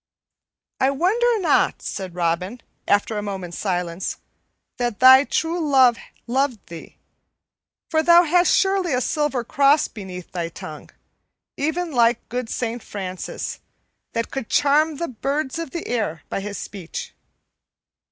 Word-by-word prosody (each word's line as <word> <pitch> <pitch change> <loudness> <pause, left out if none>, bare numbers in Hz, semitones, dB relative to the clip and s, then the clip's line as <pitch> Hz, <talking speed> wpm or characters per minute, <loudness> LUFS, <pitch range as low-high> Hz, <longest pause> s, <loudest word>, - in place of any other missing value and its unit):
"I 265 - +3
wonder 430 - +2
not," 350 - +2
said 185 -3 -5
Robin, 180 +6 -1 0.3
after 205 +1 +2
a - - -3
moment's 190 -4 -5
silence, 180 -2 -2 0.6
"that 240 -4 -2
thy 260 +2 +8
true 330 +4 -1
love 265 -6 +4 0.3
loved 255 -2 -1
thee, 170 -1 -10 0.9
for 315 -1 +3
thou 340 +2 +7
hast 350 +2 +3
surely 385 -6 +2
a - - +1
silver 295 -3 0
cross 280 +5 +3
beneath 185 -4 -9
thy 170 -2 -3
tongue, 155 -2 -9 0.7
even 320 +4 -2
like 240 -2 +2
good 245 -1 -3
Saint 235 0 -3
Francis, 185 -4 -6 0.5
that 230 0 -2
could 270 -5 -5
charm 300 +2 +3
the 340 - -2
birds 275 +5 -2
of 330 -3 -4
the 340 +4 -5
air 210 -10 -2
by - - -2
his 200 0 -5
speech." 185 -5 -7
250 Hz, 135 wpm, -22 LUFS, 195-305 Hz, 0.9 s, thy